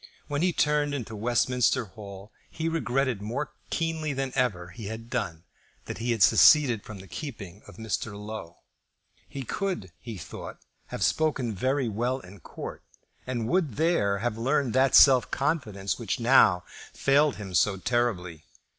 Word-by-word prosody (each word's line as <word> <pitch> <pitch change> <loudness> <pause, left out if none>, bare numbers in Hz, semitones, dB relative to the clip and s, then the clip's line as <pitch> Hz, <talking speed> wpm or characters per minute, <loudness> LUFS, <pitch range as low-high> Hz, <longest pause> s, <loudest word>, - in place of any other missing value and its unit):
When 145 0 -2
he 180 +1 +3
turned 150 -2 +1
into 115 -5 -5
Westminster 120 +3 +1
Hall 100 0 -11 0.2
he 160 0 -4
regretted 135 -7 0
more 125 +8 -3 0.2
keenly 160 -2 -1
than 135 -1 -2
ever 100 -10 0
he 105 +3 -8
had 115 +2 -7
done 95 -10 -3 0.4
that - - -6
he 120 +2 -3
had 110 -4 +3
seceded 130 -6 +6
from 110 - -9
the 95 0 -12
keeping 105 - -8
of - - -13
Mr. 110 -2 -3
Low. 105 -5 -8 0.7
He 135 - -6
could, 180 - -3
he 115 -4 -8
thought, 75 - -8 0.3
have - - -4
spoken 140 -7 +1
very 130 +6 0
well 120 +5 -1
in 95 -3 -13
court, - - -8 0.5
and 120 -3 -2
would 165 - 0
there 155 -12 +2
have 115 +1 -2
learned 130 0 +1
that 130 0 +4
self 130 -4 +7
confidence 120 -11 -2
which 115 - -2
now 115 -7 +5 0.3
failed 145 +1 +3
him 100 -3 -8
so 95 +3 +3
terribly. 95 -8 -1
120 Hz, 155 wpm, -27 LUFS, 105-140 Hz, 0.7 s, self